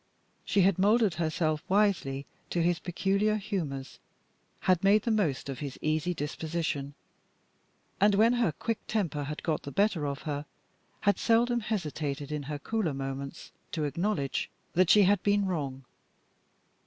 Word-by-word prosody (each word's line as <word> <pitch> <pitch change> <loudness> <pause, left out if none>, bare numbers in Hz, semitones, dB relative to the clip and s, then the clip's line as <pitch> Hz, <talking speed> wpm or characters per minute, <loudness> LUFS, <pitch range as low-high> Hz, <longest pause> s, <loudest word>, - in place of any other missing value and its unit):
She 200 - +3
had 190 -1 +3
molded 210 0 +4
herself 155 -1 0
wisely 185 -9 +2 0.2
to 170 - 0
his 175 -1 +2
peculiar 195 +5 +1
humors, 175 -11 -4 0.6
had 185 -1 +2
made 205 +2 +5
the 235 - 0
most 165 - 0
of 135 -2 -5
his 140 -3 -5
easy 155 +3 0
disposition; 150 -2 -3 1.0
and, 205 +1 +5
when 225 +4 +5
her 240 -8 +2
quick 225 +9 -3
temper 170 -9 -1
had 150 +2 -6
got 160 -2 0
the - - -7
better 200 -6 +1
of 140 -1 -4
her, 145 0 -3 0.5
had 205 - +2
seldom 240 +1 +3
hesitated 150 -9 -3
in 150 -1 -2
her 150 - -2
cooler 180 -2 -1
moments 135 +2 -5 0.2
to 155 - -1
acknowledge 150 -1 -1 0.2
that 180 0 +3
she 210 - +7
had 195 0 +3
been 205 0 +2
wrong. 140 -8 -3
170 Hz, 150 wpm, -29 LUFS, 145-205 Hz, 1.0 s, she